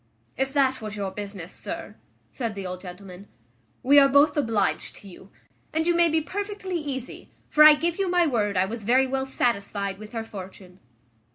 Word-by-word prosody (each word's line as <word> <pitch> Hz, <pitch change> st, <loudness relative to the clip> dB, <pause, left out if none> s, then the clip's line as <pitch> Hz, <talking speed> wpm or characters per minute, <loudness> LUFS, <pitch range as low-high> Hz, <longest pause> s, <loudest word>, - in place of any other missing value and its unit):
"If 265 Hz, 0 st, -1 dB
that 265 Hz, -3 st, +2 dB
was 215 Hz, -1 st, -6 dB
your 200 Hz, -2 st, -3 dB
business, 200 Hz, -3 st, -7 dB
sir," -, -, -7 dB, 0.4 s
said 230 Hz, -5 st, -4 dB
the 195 Hz, -1 st, -6 dB
old 185 Hz, 0 st, -6 dB
gentleman, 185 Hz, +1 st, -11 dB, 0.6 s
"we 285 Hz, +3 st, +7 dB
are 275 Hz, -1 st, +5 dB
both 285 Hz, +3 st, +4 dB
obliged 225 Hz, -9 st, 0 dB
to 200 Hz, -, -14 dB
you; 190 Hz, +1 st, -14 dB, 0.5 s
and 320 Hz, 0 st, +1 dB
you 345 Hz, -, +3 dB
may 340 Hz, 0 st, +4 dB
be 320 Hz, 0 st, +1 dB
perfectly 400 Hz, +2 st, -5 dB
easy; 275 Hz, -5 st, -6 dB, 0.2 s
for 305 Hz, -, +6 dB
I 305 Hz, 0 st, +10 dB
give 335 Hz, +4 st, -2 dB
you 390 Hz, -2 st, 0 dB
my 355 Hz, -1 st, +3 dB
word 210 Hz, -, 0 dB
I 185 Hz, -, +3 dB
was 220 Hz, +2 st, -6 dB
very 255 Hz, +5 st, +4 dB
well 265 Hz, 0 st, -2 dB
satisfied 200 Hz, -6 st, -1 dB
with 215 Hz, +2 st, -11 dB
her 225 Hz, -1 st, -3 dB
fortune." 190 Hz, -3 st, -11 dB
235 Hz, 190 wpm, -25 LUFS, 200-295 Hz, 0.6 s, I